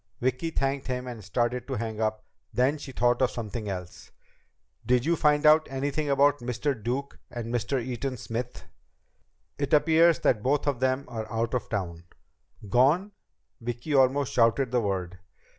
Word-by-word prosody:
Vicki 130 +6 -1
thanked 135 -3 -1
him 125 -1 -3
and 120 -4 -7
started 120 +5 -1
to 135 - -3
hang 110 -1 -4
up, 110 0 -1 0.3
then 135 +5 +1
she 145 - -8
thought 120 -1 +1
of 130 - +4
something 110 -2 -5
else. 90 -2 -7 0.7
"Did 125 0 +2
you 170 +1 +3
find 150 -1 +2
out 155 +1 +6
anything 145 +2 -2
about 145 +1 +4
Mr. 125 +4 -1
Duke 130 +4 -4
and 120 -1 -5
Mr. 125 +3 0
Eaton 125 +2 -4
Smith?" 120 +2 -5 0.9
"It 140 0 -2
appears 160 +2 +5
that 110 -5 +2
both 140 +5 +1
of 140 -4 0
them 130 +1 0
are 110 -2 -6
out 115 +1 -1
of 125 -4 -2
town 85 -5 -4 0.3
..." 105 - -18
"Gone?" 145 - +3 0.5
Vicki 120 +6 -4
almost 135 0 +3
shouted 120 +2 +3
the 125 -1 +2
word. 90 -3 -3
125 Hz, 165 wpm, -27 LUFS, 115-140 Hz, 0.9 s, out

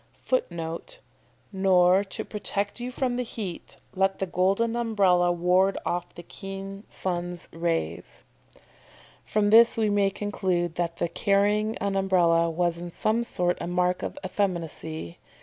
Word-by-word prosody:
[Footnote: 170 - -3 0.6
"Nor 190 0 +4
to 195 - -6
protect 205 0 -3
you 245 +1 -4
from 250 -1 -1
the 250 - 0
heat, 210 -7 -7 0.2
let 195 0 +1
the 195 - -1
golden 195 +6 +1
umbrella 195 -7 +3
ward 180 +3 +2
off 175 0 -3
the 175 - -9
keen 195 +1 -8
sun's 175 -1 -4
rays."] 165 - -3 1.0
From 210 -1 +1
this 230 +1 +7
we 215 -2 +2
may 200 -1 +3
conclude 185 -4 -1
that 170 -1 -2
the 170 - 0
carrying 205 +4 +1
an 200 -1 -2
Umbrella 175 -3 +3
was 170 0 0
in 175 0 -6
some 215 +6 0
sort 180 -6 0
a - - -3
mark 180 +1 +1
of - - -5
effeminacy. 165 - -3
190 Hz, 140 wpm, -26 LUFS, 175-205 Hz, 1.0 s, this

